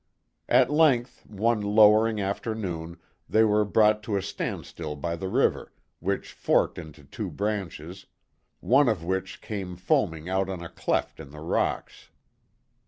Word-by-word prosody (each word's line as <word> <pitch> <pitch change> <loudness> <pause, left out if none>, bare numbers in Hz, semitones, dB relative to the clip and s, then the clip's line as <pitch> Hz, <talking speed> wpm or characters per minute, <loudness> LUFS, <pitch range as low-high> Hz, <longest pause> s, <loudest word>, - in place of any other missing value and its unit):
At - - +4
length, 140 -6 +2
one 110 +2 0
lowering 105 +1 +5
afternoon, 95 -5 -4 0.3
they 110 - +4
were 105 -1 +3
brought 105 +1 +3
to 105 -3 -2
a - - -1
standstill 80 -5 -5
by 85 +3 -3
the 95 +3 -5
river, - - 0 0.3
which 95 +3 -3
forked - - +1
into 80 -3 -11
two 70 - -6
branches, 95 -4 -4 0.5
one 135 +1 +4
of 100 -7 -1
which 95 +2 -3
came 95 -4 -5
foaming 85 -2 0
out 95 0 0
on 90 -3 -5
a 85 - -7
cleft - - -2
in 75 -3 -10
the 75 +2 -11
rocks. 80 - -2
95 Hz, 145 wpm, -26 LUFS, 85-110 Hz, 0.5 s, lowering